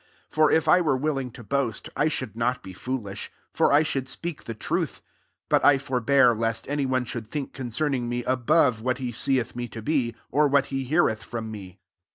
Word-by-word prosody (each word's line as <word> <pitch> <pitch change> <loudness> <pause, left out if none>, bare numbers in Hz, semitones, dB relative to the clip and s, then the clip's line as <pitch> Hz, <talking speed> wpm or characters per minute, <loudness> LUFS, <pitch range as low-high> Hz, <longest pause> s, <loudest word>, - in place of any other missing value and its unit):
6 - - -19
For 155 -1 +5
if 160 0 +2
I 180 +4 +6
were 150 -6 +2
willing 135 -2 -1
to 120 0 -12
boast) 130 -1 -2
1 150 - +2
should 130 -7 -3
not 125 +2 -1
be 95 - -9
foolish; 105 -2 -4 0.2
for - - +3
I 145 +2 +6
should 135 -4 -2
speak 170 0 -4
the 115 - -5
truth: 165 - -2 0.5
but - - +3
I 145 - +6
forbear, 130 -1 +3
lest 115 0 -2
any 145 -1 -1
one 130 -1 0
should 115 -2 -5
think 140 +3 -5
concerning 130 0 -2
me 120 0 -2
above 130 -1 +2
what 125 +2 0
he 125 -3 -3
seeth 120 0 0
me 120 0 -3
to 115 -1 -9
be, 130 -4 0 0.2
or 150 +3 +4
what 140 0 +3
he 135 -1 -1
heareth 130 -6 +2
from 115 -2 -6
me. 95 -3 -9
130 Hz, 205 wpm, -25 LUFS, 115-145 Hz, 0.5 s, I